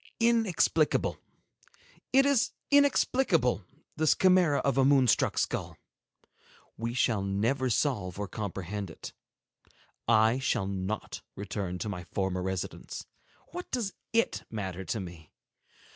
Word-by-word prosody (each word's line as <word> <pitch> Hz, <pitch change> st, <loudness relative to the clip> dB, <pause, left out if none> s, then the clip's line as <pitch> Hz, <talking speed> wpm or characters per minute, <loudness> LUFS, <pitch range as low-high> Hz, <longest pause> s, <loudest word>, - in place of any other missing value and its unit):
Inexplicable! 225 Hz, -9 st, +2 dB, 0.9 s
It 270 Hz, +1 st, +5 dB
is 280 Hz, -4 st, +2 dB, 0.2 s
inexplicable, 250 Hz, -, +3 dB, 0.3 s
this 155 Hz, -1 st, +4 dB
chimera 180 Hz, -6 st, +4 dB
of 135 Hz, -1 st, +1 dB
a -, -, +5 dB
moon 135 Hz, -1 st, +5 dB
struck -, -, +2 dB
skull! -, -, -2 dB, 1.0 s
We 115 Hz, +2 st, -4 dB
shall 115 Hz, -5 st, +2 dB
never 115 Hz, +7 st, 0 dB
solve 105 Hz, -, 0 dB
or 100 Hz, 0 st, -3 dB
comprehend 100 Hz, -1 st, -5 dB
it. 80 Hz, -, -9 dB, 0.9 s
I 110 Hz, +2 st, +4 dB
shall 120 Hz, -6 st, 0 dB
not 95 Hz, +2 st, -4 dB
return 100 Hz, -3 st, -4 dB
to 90 Hz, -, -4 dB
my 90 Hz, -3 st, -5 dB
former 95 Hz, +1 st, -2 dB
residence. 95 Hz, -1 st, -4 dB, 0.5 s
What 355 Hz, +1 st, -7 dB
does 230 Hz, -6 st, -2 dB, 0.2 s
it 230 Hz, 0 st, +1 dB
matter 95 Hz, -4 st, -4 dB
to 110 Hz, -, -2 dB
me? 85 Hz, -5 st, -9 dB
115 Hz, 120 wpm, -29 LUFS, 95-160 Hz, 1.0 s, It